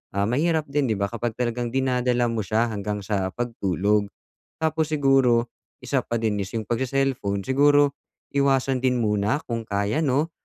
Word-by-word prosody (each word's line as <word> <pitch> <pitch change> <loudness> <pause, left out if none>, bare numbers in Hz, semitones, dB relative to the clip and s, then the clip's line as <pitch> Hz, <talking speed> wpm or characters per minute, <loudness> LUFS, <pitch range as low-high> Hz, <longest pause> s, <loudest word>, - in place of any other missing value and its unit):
ah, 100 - +1
mahirap 155 +9 +1
din 145 -2 +1
'di 110 - 0
ba, 100 0 -2
kapag 120 -1 -3
talagang 120 0 -2
dinadala 125 -2 +1
mo 115 - -2
siya 110 +3 0
hanggang 105 -1 -4
sa 95 -2 -2
pagtulog. 105 -3 0 0.5
Tapos 160 -1 0
siguro 135 -5 +3 0.3
isa - - +1
pa 115 - -1
din 105 -2 0
is 95 - -5
yung 110 -1 -2
pag-se-cellphone 120 -5 -1
siguro 145 +1 +4 0.4
iwasan 135 -2 +2
din 125 -1 +2
muna 105 +2 +1
kung 115 -1 -3
kaya 100 +5 0
'no, 150 +2 +1
120 Hz, 160 wpm, -24 LUFS, 105-135 Hz, 0.5 s, siguro